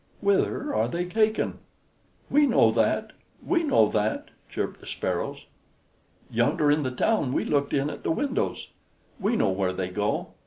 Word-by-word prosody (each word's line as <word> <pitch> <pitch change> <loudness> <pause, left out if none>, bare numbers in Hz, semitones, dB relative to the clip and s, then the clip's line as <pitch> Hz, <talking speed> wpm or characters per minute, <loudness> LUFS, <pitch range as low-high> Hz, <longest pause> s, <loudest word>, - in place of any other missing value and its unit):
Whither 200 +8 +1
are - - +1
they 175 +1 -2
taken?" 215 +4 0 0.7
"We 295 0 +4
know 115 - +4
that! 115 - 0 0.3
We 345 -2 +2
know 275 - +4
that!" 105 +1 -1 0.2
chirped - - -4
the - - -14
Sparrows. - - -3 0.9
"Yonder 150 -1 +2
in 150 +1 +2
the 130 - -1
town 130 - 0
we - - 0
looked 140 -1 0
in 140 0 +1
at 145 -1 -6
the - - -3
windows. 265 - -1 0.5
We 210 +5 +1
know 100 - +2
where 95 -1 0
they 95 -1 -3
go. 105 +3 -1
150 Hz, 160 wpm, -26 LUFS, -, 0.9 s, We